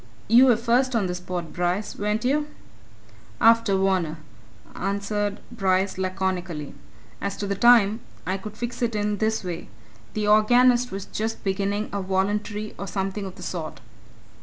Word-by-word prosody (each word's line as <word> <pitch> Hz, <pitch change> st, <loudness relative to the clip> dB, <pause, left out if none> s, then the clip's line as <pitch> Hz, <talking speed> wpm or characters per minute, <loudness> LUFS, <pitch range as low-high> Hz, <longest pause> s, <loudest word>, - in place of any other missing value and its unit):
"You 240 Hz, +4 st, +7 dB
were 240 Hz, -4 st, +5 dB
first 245 Hz, +2 st, +2 dB
on 215 Hz, -4 st, +2 dB
the 180 Hz, -, -2 dB
spot, 180 Hz, -2 st, -5 dB
Bryce, 180 Hz, +4 st, -1 dB
weren't 210 Hz, +3 st, -1 dB
you?" 295 Hz, +3 st, +1 dB, 0.9 s
"After 230 Hz, -3 st, +5 dB
Varner," 190 Hz, -5 st, +1 dB, 0.6 s
answered 200 Hz, +1 st, -2 dB
Bryce 190 Hz, -4 st, 0 dB
laconically. 185 Hz, -5 st, -2 dB, 0.5 s
"As 200 Hz, -1 st, -3 dB
to 205 Hz, -, -3 dB
the 200 Hz, -, -1 dB
time 220 Hz, 0 st, +5 dB, 0.3 s
I 190 Hz, +1 st, -1 dB
could 210 Hz, +2 st, -9 dB
fix 240 Hz, 0 st, -5 dB
it 230 Hz, -2 st, 0 dB
in 210 Hz, 0 st, 0 dB
this 220 Hz, 0 st, 0 dB
way 175 Hz, -2 st, -5 dB, 0.5 s
the 210 Hz, -1 st, 0 dB
organist 245 Hz, +4 st, +5 dB
was 195 Hz, 0 st, -5 dB
just 220 Hz, +1 st, -4 dB
beginning 200 Hz, +2 st, -1 dB
a 200 Hz, -, -1 dB
voluntary 205 Hz, +3 st, -1 dB
or 200 Hz, -, -4 dB
something 195 Hz, +1 st, -3 dB
of 185 Hz, -, -9 dB
the -, -, -10 dB
sort." 160 Hz, -6 st, -5 dB
205 Hz, 155 wpm, -24 LUFS, 190-220 Hz, 0.9 s, You